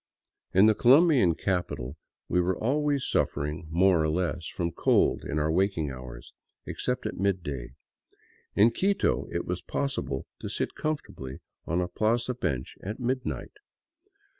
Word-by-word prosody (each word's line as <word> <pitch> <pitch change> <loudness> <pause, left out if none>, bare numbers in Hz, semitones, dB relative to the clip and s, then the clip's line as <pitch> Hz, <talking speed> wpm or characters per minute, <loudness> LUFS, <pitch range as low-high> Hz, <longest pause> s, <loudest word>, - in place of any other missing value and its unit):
In 95 +3 +6
the 110 - +6
Colombian 130 - +5
capital 90 -9 -2 0.3
we 90 - +2
were 90 +1 0
always 145 +2 +1
suffering 75 +3 -1
more 90 +1 +4
or 80 - +1
less 85 -1 -1
from 85 -1 -2
cold - - +2
in 75 - -3
our 75 +1 +1
waking 85 -4 +1
hours, 65 -2 -10 0.3
except - - -3
at - - -4
midday; 85 -11 -2 0.8
in 110 +4 +6
Quito 195 +7 +1
it 85 - -2
was 90 0 -3
possible 135 - -2
to - - -5
sit - - -2
comfortably 70 - -4 0.3
on 85 +3 +1
a 90 - -1
plaza 115 +6 0
bench 65 - -3
at 105 +5 -5
midnight. 130 +1 -2
90 Hz, 140 wpm, -28 LUFS, 80-120 Hz, 0.8 s, In